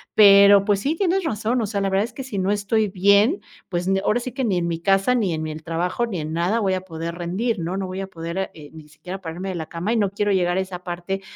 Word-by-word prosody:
pero, 200 -1 +7
pues, 205 -2 +2
sí, 285 +9 -1
tienes 380 +2 +1
razón, 235 -4 -1
o 220 - -1
sea, 200 -1 -2
la 195 - 0
verdad 195 +2 +2
es 235 - -11
que, 270 - -6
si 225 -7 -4
no 190 +1 +1
estoy 210 +1 +1
bien, 200 - +3 0.3
pues 175 -1 -2
n 195 0 +2
ahora 230 - +2
sí 255 - -5
que 260 +3 -3
ni 195 -5 +1
en 175 - 0
mi 165 -1 -2
casa, 195 +6 +2
ni 205 -8 +1
en 160 0 -3
el 155 0 -6
trabajo, 175 +8 -1
ni 195 -7 -4
en 155 +1 -5
nada 175 +7 +1
voy 195 -2 +1
a 185 - -1
poder 165 -2 -6
rendir, 185 +6 -2
¿no? 170 +2 -3
No 195 - -2
voy 185 +1 -5
a 195 - -5
poder, 170 +2 -4
eh, 150 -2 -12
ni 155 -1 -12
siquiera, 180 +5 -8
ponerme 175 +3 -5
de 185 - -4
la 160 -2 -4
cama 175 +5 -3
y - - +1
no 205 -3 +2
quiero 205 0 0
llegar 180 -2 +1
a - - +2
esa 185 -1 -6
parte 180 +2 -4
195 Hz, 285 wpm, -22 LUFS, 175-210 Hz, 0.3 s, pero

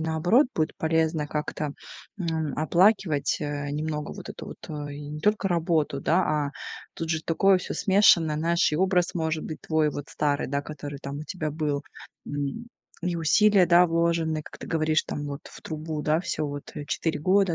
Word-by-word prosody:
наоборот 160 - +3
будет 155 0 0
полезно 160 -1 +1
как-то, 150 -1 -3 0.5
м, 160 -5 -1
оплакивать. 170 -1 +3
Э, 145 -1 -3
немного 150 0 -3
вот - - -9
эту - - -8
вот - - -10 0.2
и 145 0 -7
не 150 +1 -6
только 210 +3 +2
работу, 165 -5 +1
да, 165 - +2 0.3
а - - -7 0.4
тут 165 -1 -4
же 160 -1 0
такое 190 +4 +3
всё - - -5
смешанное. 190 -6 +4
Знаешь, 170 +1 +2
и - - +1
образ 180 0 +2
может 160 -2 -1
быть 155 - -6
твой 155 -1 +1
вот 145 -1 -6
старый, 145 -1 0
да, 140 +1 -1
который 145 -1 -7
там 140 0 -5
у - - -6
тебя 155 -3 -3
был. 150 -2 -2 0.4
М, 145 +11 -4 0.4
и 175 -1 -1
усилия, 195 +4 +4
да, 175 +1 +6
вложены, 165 -1 +1
как - - -12
ты - - -9
говоришь, 155 -1 +1
там 145 - -5
вот 140 0 -5
в - - -12
трубу. 155 -1 -5
Да, 155 +2 +1
всё 170 -4 -2
вот 145 0 -7
4 160 +1 -1
года, 185 +1 +3
160 Hz, 180 wpm, -26 LUFS, 150-170 Hz, 0.5 s, да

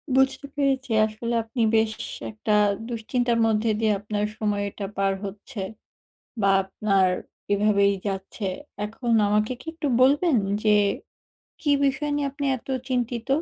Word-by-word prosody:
বুঝতে 265 +2 +2
পেরেছি। 270 -3 0
আসলে 220 +2 -4
আপনি 230 +2 -4
বেশ 220 0 +3 0.2
সে - - -10
একটা 215 0 -4 0.4
দুশ্চিন্তার 235 +1 0
মধ্যে 220 0 +1
দিয়ে 220 -1 +2
আপনার 210 0 -2
সময়টা 205 -1 -2
পার 195 0 +2
হচ্ছে 205 +4 -8 0.8
বা 195 - +3 0.2
আপনার 195 0 +2 0.4
এভাবেই 200 -1 +3
যাচ্ছে। 195 +2 -4 0.4
এখন 225 +3 -4 0.2
আমাকে 210 +3 +2
কি - - -14
একটু 300 -3 -2
বলবেন 285 +4 +4 0.3
যে, 215 - +4 0.9
কী 295 - 0
বিষয় 280 +2 0
নিয়ে 285 -1 0
আপনি 285 0 -4
এত 240 - -16 0.2
চিন্তিত? 245 -1 -2
220 Hz, 135 wpm, -25 LUFS, 205-260 Hz, 0.9 s, বলবেন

